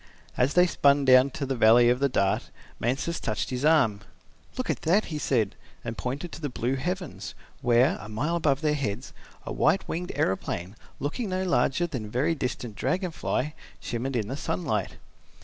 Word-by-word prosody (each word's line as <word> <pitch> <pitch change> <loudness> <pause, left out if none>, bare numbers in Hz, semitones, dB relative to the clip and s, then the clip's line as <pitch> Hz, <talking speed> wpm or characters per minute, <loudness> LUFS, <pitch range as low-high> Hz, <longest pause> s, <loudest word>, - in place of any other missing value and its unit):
As 130 +4 +1
they 180 0 +7
spun 140 -4 +3
down 130 +1 +7
to 140 +1 -4
the 135 0 -2
valley 120 +1 +6
of 125 +1 +3
the 140 0 +2
Dart, 100 -5 0 0.3
Mansus 135 +8 -1
touched 110 +1 -2
his 125 +1 -3
arm. 140 -10 +4 0.6
"Look 255 - -2
at - - -4
that," 185 +7 +3
he 150 - -2
said, 115 -8 +1 0.3
and 115 - -4
pointed 140 +9 -4
to - - -9
the 145 - -2
blue 125 0 -1
heavens 180 +5 -4 0.3
where, 120 +1 +3
a 105 - -9
mile 145 +11 -1
above 145 -4 +1
their 150 -1 +2
heads, 125 -4 -3 0.3
a - - -4
white - - +2
winged 180 +2 -3
aeroplane, 95 0 -2 0.2
looking 195 - -3
no 185 0 -1
larger 175 -3 +2
than 130 -10 -4
a - - -8
very 130 +9 +1
distant 125 -6 -4
dragon 180 - -1
fly, 150 -2 -2 0.3
shimmered 125 +3 -3
in 110 -4 -1
the 130 - -4
sunlight. 110 - -2
135 Hz, 185 wpm, -27 LUFS, 120-160 Hz, 0.6 s, they